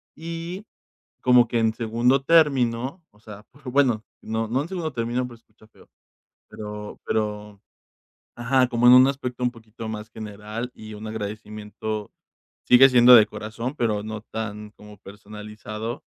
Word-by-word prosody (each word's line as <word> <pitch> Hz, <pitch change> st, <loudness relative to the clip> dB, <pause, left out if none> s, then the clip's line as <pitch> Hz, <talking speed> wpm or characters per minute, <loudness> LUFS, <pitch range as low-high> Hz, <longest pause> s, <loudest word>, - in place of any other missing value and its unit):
Y 170 Hz, +4 st, -6 dB, 0.6 s
como 125 Hz, -1 st, +5 dB
que 120 Hz, -, -1 dB
en 110 Hz, -1 st, +2 dB
segundo 120 Hz, +4 st, +1 dB
término, 135 Hz, -2 st, +2 dB
o 105 Hz, -, -26 dB
sea, 105 Hz, -2 st, -12 dB, 0.2 s
bueno, 125 Hz, -4 st, +2 dB, 0.2 s
no 110 Hz, 0 st, -3 dB
no 130 Hz, +5 st, 0 dB
en -, -, -8 dB
segundo 175 Hz, -4 st, -3 dB
término, 120 Hz, +2 st, -2 dB
pues 120 Hz, -2 st, -13 dB
se -, -, -52 dB
escucha 110 Hz, 0 st, -23 dB
feo, -, -, -22 dB, 0.6 s
pero 105 Hz, 0 st, -8 dB
pero 105 Hz, -1 st, -3 dB, 0.8 s
Ajá, 125 Hz, +2 st, +2 dB
como 120 Hz, 0 st, +3 dB
en 125 Hz, -, +9 dB
un 130 Hz, +1 st, +8 dB
aspecto 130 Hz, -2 st, -3 dB
un 125 Hz, -, +1 dB
poquito 115 Hz, -1 st, -10 dB
más 110 Hz, 0 st, -6 dB
general 110 Hz, +3 st, -7 dB
y 110 Hz, 0 st, -11 dB
un 105 Hz, +1 st, -9 dB
agradecimiento 105 Hz, 0 st, -6 dB, 0.6 s
sigue 130 Hz, +2 st, +8 dB
siendo 125 Hz, -1 st, +7 dB
de 110 Hz, -3 st, +8 dB
corazón, 115 Hz, +6 st, -6 dB
pero 110 Hz, -6 st, -1 dB
no 110 Hz, 0 st, -6 dB
tan 105 Hz, -1 st, -5 dB
como 105 Hz, -1 st, -15 dB
personalizado, 105 Hz, +3 st, -8 dB
115 Hz, 150 wpm, -24 LUFS, 105-125 Hz, 0.8 s, en